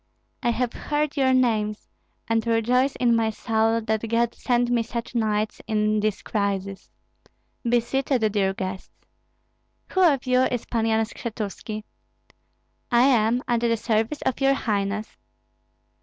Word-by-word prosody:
I 240 - +1
have 240 0 -1
heard 295 0 -2
your 265 -2 +3
names, 220 -5 +1 0.4
and 225 -1 +1
rejoice 245 +4 +2
in 240 -2 +3
my 225 -1 +2
soul 225 +1 0
that 220 +1 -2
God 235 +1 +1
sent 245 -1 0
me 240 -1 +3
such 230 +1 -5
knights 215 -2 -1
in 215 0 +1
this 210 -1 -1
crisis. 200 -2 -2 0.7
Be 240 0 +2
seated, 250 -2 0
dear 195 -2 +1
guests. 190 0 -7 0.9
Who 375 - +1
of 290 -7 +4
you 255 0 +3
is 245 -3 -2
Pan 225 -1 -1
Yan 220 0 +2
Skshetuski?" 215 -1 -6 1.1
"I 240 0 +5
am, 245 -2 +3
at 240 -1 +2
the 230 -1 +1
service 225 +5 -1
of 260 - -1
your 270 0 +4
highness." 210 -3 -2
230 Hz, 140 wpm, -24 LUFS, 215-245 Hz, 1.1 s, I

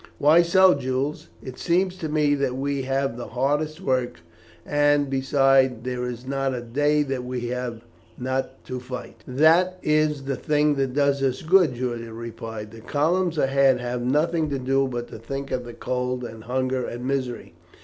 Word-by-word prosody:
"Why 155 +4 +6
so, 185 +2 +5
Jules? 135 +2 -3
It 130 -1 -8
seems 185 +2 +1
to 160 -4 -4
me 150 -1 +2
that 140 -3 0
we 140 +1 -1
have 135 -1 -1
the 120 - -6
hardest 150 +5 -1
work, 125 - -1 0.4
and, 145 -1 +2
besides, 135 -2 +3
there 125 -1 -3
is 125 0 -6
not 135 -1 -1
a 120 - -4
day 145 +5 +1
that 135 -3 -3
we 125 -1 -4
have 125 -2 -4 0.3
not 130 +1 -3
to 130 0 -5
fight." 125 0 -8
"That 165 +7 +4
is 150 -2 +1
the 135 0 -2
thing 150 +2 +2
that 135 -1 -1
does 140 -1 +2
us 130 -1 0
good," 170 -5 +4
Julian 120 -2 -4
replied. 115 -2 -7
"The 115 0 -12
columns 165 +7 0
ahead 135 -2 +3
have 125 0 -3
nothing 155 +5 +1
to 140 - -1
do 135 +1 +1
but 120 -2 -4
to - - -9
think 135 +4 -6
of 125 -1 -2
the 120 - -8
cold, 125 +1 -2
and 110 -2 -8
hunger, 130 +1 -1
and 120 +1 -5
misery. 130 -3 -3
135 Hz, 180 wpm, -24 LUFS, 125-145 Hz, 0.4 s, Why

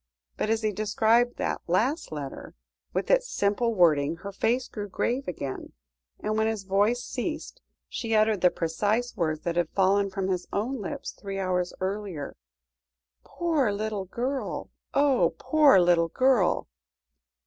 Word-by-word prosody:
But - - -2
as 225 0 +1
he 215 - +1
described 220 +4 +2
that - - -2
last 240 - 0
letter, 145 -3 -7 0.4
with 185 - -1
its - - +3
simple 215 +3 0
wording, 160 -4 +4
her 200 - -4
face 240 +6 0
grew 205 -2 -6
grave 250 +7 -1
again, 140 -6 -5 0.5
and 215 - -2
when 220 0 +2
his 220 -3 -2
voice 205 +5 +1
ceased, 310 - -5 0.3
she 225 -2 -2
uttered 215 -2 +3
the 180 - +6
precise 205 +9 -1
words 155 -4 -1
that 170 0 -2
had 170 -2 +1
fallen 195 +1 +3
from 190 0 -3
his 180 -1 -2
own 235 +4 -2
lips 280 +7 -5
three 195 -1 -7
hours 180 -2 0
earlier. 190 -6 -4 0.9
"Poor 315 -10 0
little 210 -1 -3
girl 255 +8 -3 0.2
oh! 280 -2 +3
poor 300 -9 +5
little 175 -1 +3
girl!" 255 -3 +2
205 Hz, 150 wpm, -27 LUFS, 185-245 Hz, 0.9 s, the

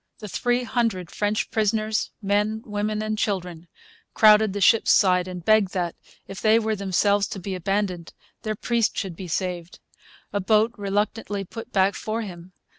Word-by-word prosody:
The 210 - -8
three 245 +5 0
hundred 225 -7 -1
French 210 +1 -1
prisoners, 215 0 0
men, 210 +2 0
women, 210 -1 -2
and 215 0 -2
children, 180 -4 -3 0.5
crowded 215 -1 +6
the 205 - -4
ship's 225 +3 +4
side 180 -2 +4
and 180 -2 -7
begged 215 -3 +3
that, 175 -2 -1 0.3
if 195 - -8
they 220 0 +5
were 220 -1 0
themselves 200 +1 +1
to 195 - -6
be 190 +1 -5
abandoned, 185 -1 -2 0.3
their 215 -1 -3
priest 235 +1 0
should 190 -5 -3
be 185 +2 -8
saved. 175 0 -3 0.6
A 205 - 0
boat 215 +3 +2
reluctantly 205 0 -2
put 225 +4 -9
back 195 0 +3
for 220 +3 -3
him. 180 -2 -10
205 Hz, 165 wpm, -24 LUFS, 185-215 Hz, 0.6 s, crowded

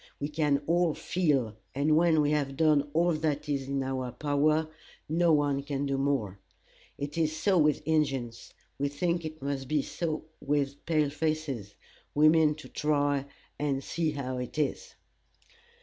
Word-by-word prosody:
We 145 - -2
can 150 -2 +1
all 170 0 +2
feel, 140 - 0 0.2
and 150 +3 +3
when 160 -1 +4
we 145 0 +2
have 140 -3 -1
done 150 -2 +3
all 170 +3 +2
that 155 -1 -1
is 140 -2 -2
in 140 0 -1
our 130 -1 -3
power, 150 +4 +1 0.4
no 165 +2 +3
one 145 -2 +2
can 140 0 -3
do 140 -1 0
more. 125 -9 -1 0.6
It 145 +3 -4
is 155 -1 +1
so 190 -1 +3
with 150 -1 +2
Injins; 135 -7 -1 0.3
we 140 - +1
think 170 +4 -1
it 155 -2 -7
must 140 -1 -3
be 150 0 +1
so 155 -3 -3 0.2
with 140 -1 -1
pale 155 -3 +2
faces. 145 -9 -2 0.4
We 150 +1 +6
mean 155 -2 +4
to 150 - -11
try 145 -2 0 0.3
and 140 -2 -1
see 165 -2 -1
how 130 -3 -3
it 125 +4 -6
is." 150 -2 -2
145 Hz, 165 wpm, -29 LUFS, 140-155 Hz, 0.6 s, We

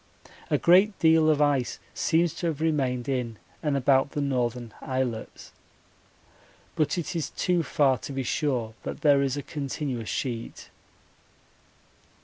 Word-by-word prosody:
A - - +3
great 190 +4 +4
deal 160 -1 +4
of 150 -1 +3
ice 140 -4 +1 0.2
seems 170 0 +1
to 175 - -3
have 155 -3 -2
remained 135 -6 0
in 125 -5 -2 0.2
and 150 -3 0
about 135 +1 +2
the - - -2
northern 125 -4 -1
islets, 130 -4 -4 1.2
but 155 +3 +1
it 175 +1 -3
is 165 - -2
too 180 -1 0
far 140 -5 +2
to - - -7
be 135 -1 -2
sure 125 -4 -1
that - - -6
there 145 -2 +5
is 135 0 0
a 145 - -4
continuous 135 - -4
sheet. 115 +6 -4
140 Hz, 140 wpm, -26 LUFS, 125-155 Hz, 1.2 s, there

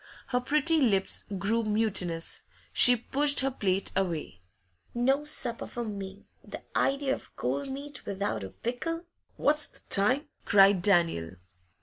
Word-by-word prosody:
Her 250 -1 +1
pretty 300 +5 +2
lips 195 -7 +2
grew 215 +5 0
mutinous; 210 -6 0 0.3
she 245 -1 +8
pushed 280 +5 +1
her 270 +1 0
plate 195 -6 -1
away. 165 - -2 0.5
'No 270 +4 +2
supper 245 -5 -3
for 240 - -5
me! 200 -2 -7 0.2
The - - -9
idea 275 0 +1
of - - -9
cold 280 -1 -2
meat 280 +2 -7
without 195 - -3
a 95 - -6
pickle.' 330 - -4 0.3
'What's 300 +1 +2
the - - -13
time?' 255 +10 +2 0.2
cried 195 -2 +5
Daniel. 170 - +2
225 Hz, 135 wpm, -28 LUFS, 195-275 Hz, 0.5 s, she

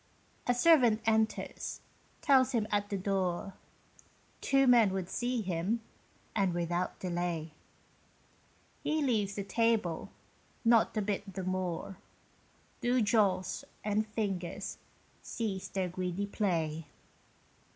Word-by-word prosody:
A 245 - +3
servant 245 -6 +5
enters, 220 0 0 0.4
tells 265 -2 +4
him 225 -3 +2
at 205 0 0
the 200 - -1
door 190 -1 -1 0.9
Two 270 0 +4
men 240 -5 +6
would 190 -2 -3
see 245 -2 -1
him, 185 +5 -1 0.6
and 195 -5 +2
without 175 +1 -1
delay. 175 -3 -2 1.3
He 310 0 +1
leaves 210 -7 +1
the 200 - -2
table, 220 -6 +1 0.6
not 230 -1 +4
a 215 - +1
bit 200 -1 -3
the 190 - -3
more 185 0 -3 0.8
Do 245 +1 +2
jaws 205 -4 +2 0.2
and 215 +1 0
fingers 195 -5 -3 0.4
cease 205 -5 -3
their 190 -2 -2
greedy 185 +2 -2
play. 165 -7 -1
200 Hz, 110 wpm, -32 LUFS, 180-230 Hz, 1.3 s, men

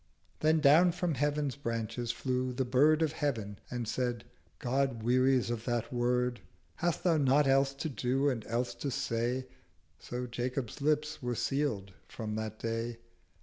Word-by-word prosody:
Then 155 0 +3
down 160 +5 +6
from 175 -1 -1
Heaven's 145 0 0
Branches 115 -2 -3
flew 130 +1 -1
the 130 +1 -1
Bird 150 +6 +4
Of 155 - +1
Heav'n 115 -10 -2
and 120 -2 -3
said 120 -1 -1 0.3
'God 130 -2 0
wearies 130 +1 +3
of 115 -1 -4
that 120 -1 -1
word: 125 0 +1 0.4
Hast 175 -1 -1
thou 170 -3 +4
not 145 +1 +4
else 135 0 +3
to 150 - -3
do 135 0 0
and 125 -6 0
else 120 +2 -1
to 140 - -4
say?' 125 -1 -1 0.5
So 125 +1 -4
Jacob's 125 +2 -3
lips 150 +1 0
were 125 -1 -2
sealéd 135 -8 -1 0.2
from 110 -2 -5
that 110 0 -4
Day. 115 +1 -3
125 Hz, 155 wpm, -31 LUFS, 120-145 Hz, 0.5 s, down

